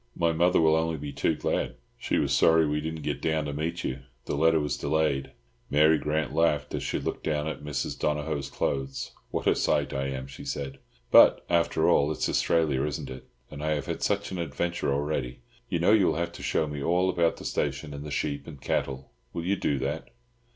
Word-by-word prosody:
My 85 -1 +2
mother 90 +3 +3
will 80 -1 +5
only 80 0 0
be 75 0 -6
too 80 - +1
glad. - - -1 0.2
She - - 0
was - - +1
sorry 80 0 +5
that 75 - 0
we 75 0 0
did 80 +1 -3
not 80 - -8
get - - -2
down 80 -1 0
to 75 - -3
meet 80 +3 -3
you. 65 +1 -3 0.3
The - - -2
letter 80 +2 +4
was 75 -3 -1
delayed." 75 -4 0 0.4
Mary 75 +2 +5
Grant 75 -2 -1
laughed 75 -2 +1
as - - -2
she - - -1
looked - - -4
down 75 -1 0
at 80 -3 -5
Mrs. 75 -2 -3
Donohoe's 75 -1 -1
clothes. 70 -1 -2 0.2
"What - - -3
a - - +4
sight 70 -1 +1
I 70 0 -1
am!" 65 -1 -4
she 70 +1 -10
said. 70 -1 -4 0.3
"But, - - +7
after 85 -2 +2
all, 70 +2 +4
it's 75 - -1
Australia, 75 -5 +2
isn't 75 -3 -3
it? 65 - -9 0.2
And 75 -1 -7
I 75 0 +1
have 75 -2 -3
had - - -4
such 100 -1 0
adventures 85 -1 -2
already! 70 -3 -2 0.3
You - - 0
know 85 +4 +3
you 105 -4 +5
will - - +1
have 85 +1 -2
to 85 - -10
show 80 - +1
me 75 -1 -5
all 90 +5 +2
about 85 -3 +2
the - - -10
station 75 -2 -2
and 70 0 -6
the 75 - -6
sheep 70 0 -2
and 75 -4 -9
cattle. 65 0 -2 0.2
Will 85 -1 -4
you 100 +3 +2
do 75 -6 0
that?" - - -3
75 Hz, 220 wpm, -27 LUFS, 70-80 Hz, 0.4 s, But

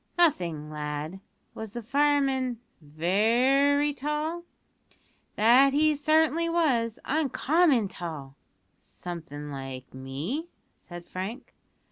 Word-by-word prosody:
"Nothing, 170 - +1
lad. 150 +4 -5 0.3
Was 220 -2 -7
the 240 -1 -5
fireman 270 -1 +1 0.2
very 240 - +2
tall?" 300 +5 -3 0.9
"That 250 +6 +5
he 305 +1 +4
certainly 315 +3 +2
was 250 -10 +1
uncommon 295 - +2
tall." 155 -7 -7 0.4
"Something 150 -4 -8
like 135 -2 -7
me?" 140 - -4 0.3
said 175 -1 -11
Frank. 195 +7 -6
235 Hz, 90 wpm, -27 LUFS, -, 0.9 s, That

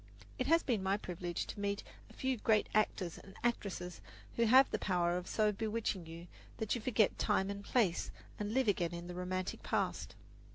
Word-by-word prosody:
It - - 0
has 330 +1 +5
been 230 -6 0
my 190 +1 +1
privilege 175 -3 -4
to - - -7
meet 200 0 -1 0.3
a - - -15
few 265 0 0
great 215 -1 +2
actors 195 -5 +1
and 195 - -14
actresses 195 -7 -2 0.3
who 235 - +3
have 260 +4 +7
the - - 0
power 175 -2 +1
of 180 0 -3
so 215 -1 +2
bewitching 210 -4 -2
you 165 +1 -8 0.3
that 220 -2 -1
you 240 - -2
forget 220 -2 +2
time 190 +1 +2
and 200 0 -6
place 200 -7 +1 0.3
and 210 0 -2
live 260 +1 +2
again 175 -4 +1
in 170 0 -6
the 180 - -6
romantic 180 +1 -3
past. - - -1
200 Hz, 195 wpm, -35 LUFS, 180-220 Hz, 0.3 s, have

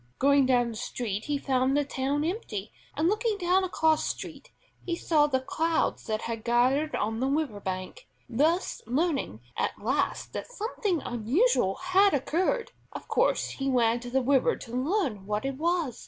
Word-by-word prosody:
Going 280 -1 +4
down 245 -2 +3
the - - -8
street 215 -3 -4
he 295 -1 0
found 265 0 +1
the 290 - +1
town 275 +2 -1
empty, 240 - -4 0.3
and, 315 +2 +2
looking 430 +2 +1
down 365 0 +2
a 375 - -2
cross 315 -3 +2
street, - - -5 0.3
he 345 - -2
saw 305 -3 +3
the 260 -3 +1
crowds 320 +5 -1
that 215 0 -2
had 225 -1 -4
gathered 255 +6 +2
on 220 +2 -1
the 260 - +1
river 275 -7 -1
bank, 185 - -5 0.2
thus 310 +9 +1
learning 275 - -1
at - - -1
last 255 +7 -1
that - - -5
something 420 - -2
unusual 240 - +1
had 370 0 +3
occurred. 370 - 0 0.2
Of - - -8
course - - +1
he 270 0 -2
ran 235 -2 +3
to 245 0 -8
the 260 +1 +1
river 270 0 +3
to 230 - -11
learn 255 - -1
what 210 +3 -1
it 270 -1 -3
was. 335 -6 0
275 Hz, 175 wpm, -28 LUFS, 240-340 Hz, 0.3 s, Going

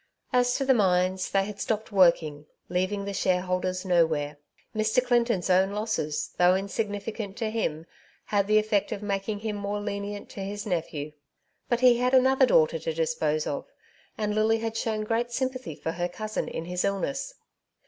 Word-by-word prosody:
As 245 0 +3
to 275 - 0
the 265 - +5
mines, 185 -3 +2
they 195 0 +2
had 205 0 -7
stopped 220 0 -2
working, 165 -6 +3 0.2
leaving 185 +3 -1
the 200 - -4
shareholders 185 0 0
nowhere. 160 -5 +1 0.4
Mr. 220 +4 +2
Clinton's 235 -6 +2
own 190 +1 +3
losses, 210 -8 -2
though 180 +1 +6
insignificant 205 +1 -3
to 220 -2 -2
him, 165 -8 -2 0.4
had 200 -1 +1
the 215 0 +4
effect 215 -2 +1
of 205 - -4
making 205 +1 -2
him 215 -1 -2
more 205 0 -3
lenient 205 0 -4
to - - -9
his 200 +1 -4
nephew. 160 -6 -3 0.6
But 240 0 +1
he 245 -2 +6
had 250 +1 +3
another 260 0 +5
daughter - - +4
to 485 0 -3
dispose 485 -1 0
of, - - -3 0.5
and 210 -1 -1
Lily 215 +1 +3
had 225 0 -3
shown 220 -1 -1
great 230 +2 -1
sympathy 255 - -3
for 160 - -3
her 175 +1 -2
cousin 215 +4 -4
in 165 - -5
his 180 +1 -2
illness. 275 - -2
205 Hz, 170 wpm, -27 LUFS, 185-230 Hz, 0.6 s, though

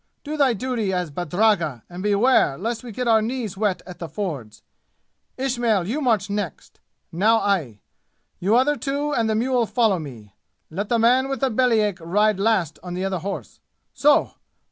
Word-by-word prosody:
Do 300 +1 -4
thy 275 -5 +3
duty 230 -3 -2
as 180 -4 -2
badragga 175 - 0
and 175 +1 -8
beware 205 - +3
lest 230 +4 -3
we 240 - -8
get 250 +3 -3
our 220 -1 +5
knees 225 -3 -3
wet 195 -3 -1
at 180 -1 -10
the 170 - -6
fords! 145 - -5 0.7
Ismail, 240 -8 0
you 275 +9 -2
march 225 -7 +1
next. 200 -6 -5 0.3
Now 215 +7 +3
I. 165 - -1 0.6
You 200 +5 +2
other 280 +4 +3
two 290 +1 -2
and 225 -3 +1
the 220 - +1
mule 245 0 +1
follow 220 -7 +2
me. 115 -10 -10 0.4
Let 200 +6 -4
the 235 - +2
man 250 +4 +3
with 270 0 -3
the 270 -2 +1
belly 235 -1 +3
ache 205 -3 -1
ride 205 +4 +1
last 195 -8 +1
on 180 0 -6
the 185 +1 -2
other 190 -2 -2
horse. 195 +3 -6 0.3
So! 295 0 +3
210 Hz, 180 wpm, -23 LUFS, 180-245 Hz, 0.7 s, our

